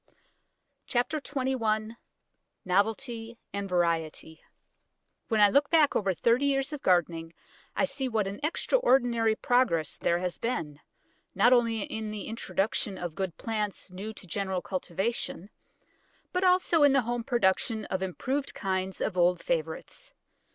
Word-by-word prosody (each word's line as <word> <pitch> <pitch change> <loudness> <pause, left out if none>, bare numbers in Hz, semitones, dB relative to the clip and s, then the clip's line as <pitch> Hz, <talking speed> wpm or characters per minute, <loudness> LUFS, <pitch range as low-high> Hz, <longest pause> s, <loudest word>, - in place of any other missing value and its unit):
CHAPTER 275 +5 0
XXI 235 -6 -1 0.7
NOVELTY 225 +4 0 0.2
AND 200 -1 -3
VARIETY 165 -2 -1 0.9
When 220 - +1
I 205 -1 +7
look 280 +3 +3
back 315 -4 +4
over 195 -3 +1
thirty 240 +9 +2
years 275 +1 0
of 295 - -5
gardening, 165 -2 +1 0.4
I - - +2
see 275 -1 -1
what 220 -3 0
an 195 +1 -5
extraordinary 245 - +2
progress 225 - +1
there 170 - +2
has 180 0 -3
been, 155 -12 -3 0.6
not 245 - +5
only 230 -3 +2
in 220 +1 -4
the 210 -2 -5
introduction 210 -2 -2
of 175 -3 -5
good 185 0 -4
plants 210 -4 -3
new 195 +4 -6
to 200 - -9
general 190 0 -2
cultivation, 190 +2 -3 0.8
but 365 +1 0
also 360 -3 +4
in 285 -2 +6
the 275 - +4
home 240 +1 -2
production 225 -2 +1
of 190 - -3
improved 260 +10 -2
kinds 190 -1 -2
of 195 - -1
old 175 +1 +4
favourites. - - -4
220 Hz, 135 wpm, -28 LUFS, 190-260 Hz, 0.9 s, I